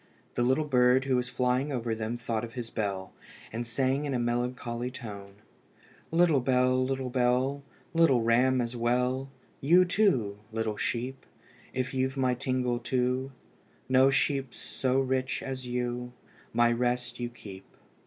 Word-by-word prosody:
The - - -1
little 130 +5 +3
bird 125 -1 +4
who 135 -1 +2
was 125 0 0
flying 125 +4 0
over 120 -3 -1
them 110 +1 -3
thought 115 -2 -2
of 115 -1 -7
his 120 -3 -6
bell, 100 -3 -3 0.4
and 120 +1 -3
sang 135 +4 0
in 140 -2 -1
a - - 0
melancholy 120 0 -2
tone 100 -6 -9 0.7
"Little 165 -3 +4
bell, 130 0 +2
little 130 -1 -2
bell, 130 +2 +1 0.3
Little 165 -8 +4
ram 125 +3 +3
as 120 0 -3
well, 125 +3 0 0.3
You, 175 +6 +5
too, 130 - +1
little 110 -1 -2
sheep, 125 +4 -3 0.5
If 130 +1 -2
you've 130 +1 -1
my 130 -1 +2
tingle 125 -1 -1
too, 125 +2 -1 0.6
No 130 +1 +5
sheep's 135 -1 0
so 130 0 -1
rich 130 -1 -1
as 130 -1 -5
you, 125 0 -3 0.4
My 120 0 +3
rest 120 0 -1
you 120 0 -2
keep." 100 -5 -11
125 Hz, 150 wpm, -29 LUFS, 120-130 Hz, 0.7 s, You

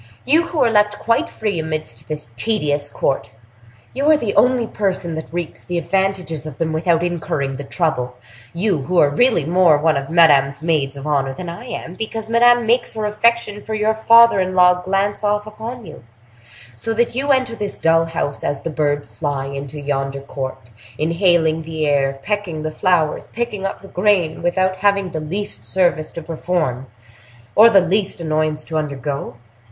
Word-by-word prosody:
—you, 320 +6 +3
who 340 - -6
are 240 -5 +3
left 210 -1 +2
quite 230 0 0
free 210 -6 -3
amidst 155 -7 -5
this 150 -6 -6
tedious 145 - 0
court. 135 -6 -1 0.6
You 280 +4 +1
are 310 - +6
the 225 -8 -2
only 250 -1 +3
person 190 -6 -2
that 160 0 -6
reaps 170 -1 -5
the 175 - -3
advantages 180 -4 -1
of 150 - -9
them 160 -1 -1
without 165 +1 +1
incurring 150 -6 -2
the 145 - -6
trouble,—you, 125 - -3
who 180 +6 -2
are 145 -3 +5
really 225 - +3
more 170 -2 +4
one 155 0 +2
of 140 0 -4
Madame's 145 -4 +4
maids 145 -4 0
of 140 - -8
honor 135 -3 0
than 175 +3 -6
I 175 +8 -8
am, 175 -8 -6
because 220 +2 -5
Madame 240 0 +5
makes 240 +2 +1
her 215 -1 -2
affection 210 0 +1
for 220 - -4
your 215 +1 +1
father 230 0 +6
in 185 0 -1
law 180 0 +5
glance 195 +3 -1
off 210 0 0
upon 220 +2 -8
you; 155 -6 -12 0.7
so 225 - -3
that 235 +1 +1
you 270 +4 -2
enter 260 -3 +1
this 205 -2 -4
dull 165 0 +3
house 165 -3 -3
as 145 -1 -2
the 165 - -4
birds 145 -1 -1
fly 145 -4 -3
into 140 +1 -6
yonder 140 -1 -3
court, 130 -4 -7 0.3
inhaling 165 0 +2
the 160 -1 -3
air, 135 -2 +1
pecking 200 -7 -3
the 155 - -3
flowers, 170 -2 0
picking 215 -4 -3
up - - -7
the - - -10
grain, 180 -5 +1
without 185 +2 0
having 200 -1 +1
the 160 - -3
least 155 - -4
service 155 +3 0
to 165 - -7
perform, 155 -6 -2 0.7
or 220 +2 +8
the 200 -4 +6
least 190 +1 0
annoyance 155 -1 -1
to 160 - -3
undergo. 140 -3 -4
170 Hz, 180 wpm, -19 LUFS, 150-210 Hz, 0.7 s, or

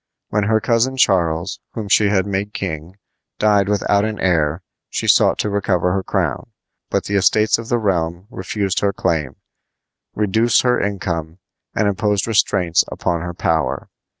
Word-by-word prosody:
When 105 -1 0
her 110 +1 +2
cousin 115 +4 +1
Charles, 85 -5 +1
whom 110 -3 -5
she 105 +1 +4
had 100 -2 +1
made 100 +1 -3
king, 85 0 -5 0.4
died 105 -2 +3
without 100 0 +2
an 110 -1 -2
heir 85 -2 +1 0.3
she - - -3
sought - - +4
to 105 - -1
recover 90 -3 0
her 95 - 0
crown; - - -2 0.4
but - - 0
the 100 - -5
estates 105 +3 +3
of 115 - -8
the 120 - +2
realm 90 -4 -1
refused 95 +1 -2
her 100 -1 0
claim, 80 -8 -1 0.8
reduced 110 +3 +2
her 125 -1 +2
income, 85 -5 -3 0.4
and 110 - +2
imposed 100 0 0
restraints 95 -6 +2
upon 85 -1 -2
her 85 0 -6
power. 75 -6 -1
100 Hz, 155 wpm, -19 LUFS, 85-105 Hz, 0.8 s, she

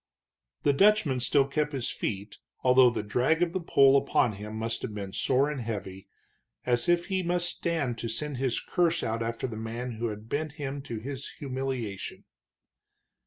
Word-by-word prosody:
The 145 - +4
Dutchman 180 -6 +4
still 135 +2 +3
kept 150 +2 -1
his 130 -3 -2
feet, 100 0 -4 0.2
although 125 0 +7
the 115 -3 -3
drag 125 +11 +2
of 170 -1 -1
the 185 - -1
pole 135 -4 +5
upon 130 -3 +3
him 105 +1 -7
must 115 +1 -2
have 105 - -5
been 100 -2 -5
sore 135 +2 +2
and 150 -3 -3
heavy, 100 -4 -5 0.6
as 120 +5 +2
if 175 0 +3
he 190 -1 0
must 175 0 0
stand 145 -9 -1
to 115 - -3
send 145 +5 -2
his 130 -2 0
curse 170 -1 +1
out 115 +1 -1
after 115 +1 -2
the 115 -4 -4
man 115 +3 -4
who 115 +1 -1
had 105 0 -7
bent 150 +3 -2
him 140 -2 -4
to 125 -5 -6
his 135 +4 -6
humiliation. 130 -7 -4
130 Hz, 180 wpm, -28 LUFS, 115-150 Hz, 0.6 s, although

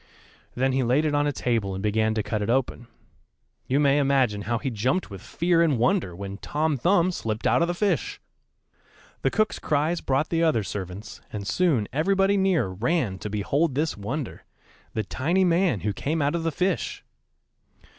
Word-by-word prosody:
Then 130 +2 +1
he 135 - +2
laid 130 +5 +2
it 150 - 0
on 145 0 +2
a - - +1
table 115 -8 -1
and 95 - -5
began 110 +1 +1
to 110 - 0
cut 105 +1 -2
it 105 - -2
open. 120 -1 0 0.8
You 135 +3 +2
may 140 0 +4
imagine 135 -7 +2
how 120 +3 -1
he 135 +2 -3
jumped 125 - -1
with 95 -2 -8
fear 170 - +1
and 155 -6 +3
wonder 120 - +1
when 100 +1 -6
Tom 155 0 -1
Thumb 175 +6 +2
slipped 110 -9 -4
out - - +3
of 170 - +3
the 175 - -2
fish! 215 - -1 1.0
The - - +2
cook's 215 -1 0
cries 155 +3 0
brought 135 +3 0
the 165 -1 0
other 155 -10 +2
servants, 95 +2 -7
and 105 -2 -5
soon 140 - +1
everybody 195 +6 +2
near 190 - +2
ran 100 - -1
to 105 - -5
behold 135 +9 0
this 155 +3 0
wonder 120 +7 -5 0.5
the 110 - 0
tiny 170 - 0
man 175 - +2
who 105 -1 -1
came 155 +10 -2
out 145 0 +1
of 170 - -1
the 165 0 -1
fish. 185 +6 -1
135 Hz, 185 wpm, -25 LUFS, 110-165 Hz, 1.0 s, may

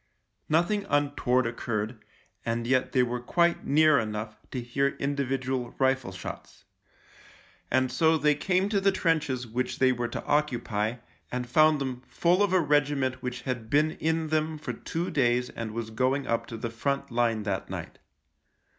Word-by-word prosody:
Nothing 195 +6 +2
untoward 140 -3 +2
occurred, 115 -1 -3 0.4
and 115 0 -2
yet 130 +1 +1
they 125 - +4
were 125 0 -2
quite 170 +7 +1
near 155 0 +5
enough 110 0 -4
to 130 - -4
hear 135 +3 0
individual 135 -3 -2
rifle 130 -5 +1
shots. 95 - -9 1.1
And 130 0 +2
so 160 +5 +3
they 150 0 +3
came 185 +6 +1
to 200 -2 +1
the 195 0 +4
trenches 155 -9 0
which 120 +3 -3
they 130 -1 +4
were 120 -1 -1
to 120 - -6
occupy, 120 -7 0 0.4
and 125 0 -3
found 155 +4 +4
them 130 -2 -3
full 175 +3 +2
of 205 -2 +3
a 185 - +4
regiment 145 -4 +1
which 125 0 -4
had 125 -4 -4
been 150 +4 +3
in 160 0 -1
them 155 0 0
for 150 - -5
two 175 +3 -4
days 125 -4 +1
and 115 -1 -5
was 110 0 -5
going 130 +4 +1
up 115 -2 -1
to 115 - -6
the 115 0 -4
front 140 +4 -2
line 115 -2 +1
that 100 -3 -3
night. - - -7
130 Hz, 165 wpm, -28 LUFS, 120-155 Hz, 1.1 s, near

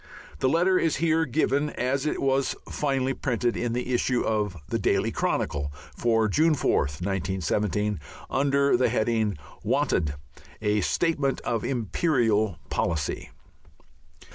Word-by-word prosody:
The 130 - +2
letter 180 +4 +3
is 165 -3 +1
here 160 +1 +2
given 145 +2 +1
as 135 +3 -1
it - - -1
was 135 0 +1
finally 135 -2 0
printed 120 -3 -1
in 120 -1 -1
the 125 +1 -2
issue 125 0 +1
of 105 -5 -1
the - - -1
Daily - - +1
Chronicle 70 0 -1 0.2
for 115 -2 +2
June 155 +9 +3
4th, 75 - 0
1917, 100 +1 -1 0.3
under 140 0 +2
the 125 0 +3
heading, 110 -4 +1 0.3
"Wanted 75 -2 +1 0.4
a 105 -1 +1
Statement 145 - +1
of 115 -2 -1
Imperial 115 - +1
Policy." 75 -5 -1
120 Hz, 125 wpm, -26 LUFS, 105-140 Hz, 0.4 s, letter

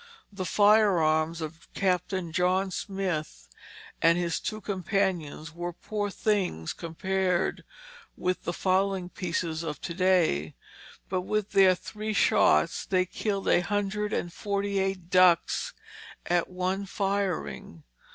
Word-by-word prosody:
The 185 -2 -4
firearms 170 -6 +3
of 160 +1 -8
Captain 185 -2 0
John 185 +3 +1
Smith 180 - -4 0.5
and 170 +1 +5
his 170 -1 -1
two 215 - -4
companions 185 -6 -2
were 175 +1 -4
poor 205 +4 -3
things 190 - -1
compared 180 +2 -1 0.5
with 180 0 -1
the 175 - -2
fowling 190 0 0
pieces 170 -3 -3
of 150 -3 -4
to 170 - -4
day, 170 - +2 0.5
but 185 -1 -1
with 210 +2 -2
their 190 -2 +6
three 215 +4 -5
shots 75 - +3
they 185 -1 +2
killed 200 +1 -3
a - - +5
hundred 205 +2 -1
and 175 -4 -2
forty 200 -1 -1
eight 190 -2 -2
ducks 180 -2 +4 0.5
at 175 -1 +1
one 185 +2 -2
firing. 185 - -2
185 Hz, 120 wpm, -28 LUFS, 170-195 Hz, 0.5 s, their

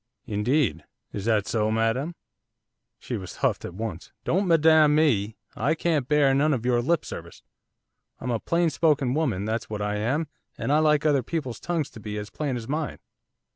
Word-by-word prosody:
'Indeed. 105 - 0 0.3
Is 100 -1 -4
that 110 -3 +2
so, 110 -2 0
madam?' 115 +9 0 0.8
She 120 - -5
was 95 -3 -8
huffed - - +1
at 85 - -7
once. 105 -5 -5
'Don't 190 +3 +1
madam 160 -2 +5
me, 110 -9 +2 0.2
I 145 +8 +1
can't 155 -5 0
bear 145 -2 +4
none 145 +2 +3
of 120 -2 -5
your 120 -1 +3
lip 165 +7 +1
service. - - -9 0.8
I'm 125 - -3
a 115 - 0
plain 170 +4 +1
spoken 145 -4 +2
woman, 130 -11 0
that's 110 +1 -2
what 105 -1 -3
I 105 0 -1
am, 130 +10 0 0.3
and - - -2
I 150 - +5
like 150 -1 +3
other 145 -3 +4
people's 130 -3 -4
tongues 160 -5 -2
to - - -11
be 105 0 -5
as 105 +1 -6
plain 140 -5 -2
as 115 -1 -7
mine. 150 0 -2
130 Hz, 185 wpm, -26 LUFS, 110-155 Hz, 0.8 s, madam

